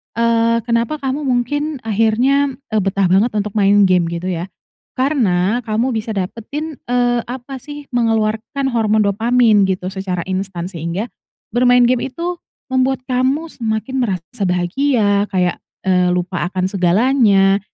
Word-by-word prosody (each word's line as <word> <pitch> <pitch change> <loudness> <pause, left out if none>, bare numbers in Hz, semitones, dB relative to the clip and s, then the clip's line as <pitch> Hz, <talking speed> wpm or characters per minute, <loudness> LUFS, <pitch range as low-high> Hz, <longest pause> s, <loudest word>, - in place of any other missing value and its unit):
eee, 230 0 +2
kenapa 235 +6 -1
kamu 270 +3 -2
mungkin 285 +4 -1
akhirnya, 240 +6 +2 0.2
eee, 215 - +2
betah 195 0 +1
banget 205 +6 +3
untuk 210 0 -1
main 205 0 +4
game 180 -3 +3
gitu, 170 +2 -3
ya? 175 +1 -3 0.5
Karena 235 -7 +1
kamu 225 +4 0
bisa 220 0 -3
dapetin, 255 +11 -5
eee, 245 0 +1
apa, 260 +2 -7
sih, 290 +1 -10
mengeluarkan 225 +2 0
hormon 220 -2 +2
dopamin 220 0 +3
gitu 185 0 -2
secara 190 -3 -3
instan 190 -2 -3
sehingga, 170 +6 -4 0.4
bermain 245 +1 +4
game 245 +1 +2
itu 345 +5 -4 0.3
membuat 260 0 +1
kamu 260 +5 0
semakin 225 -2 -3
merasa 195 0 -4
bahagia, 200 +4 +1
kayak, 180 -2 +1 0.3
eee, 180 -1 +3
lupa 180 0 -1
akan 185 -1 0
segalanya, 195 +1 +3
225 Hz, 135 wpm, -18 LUFS, 190-255 Hz, 0.5 s, main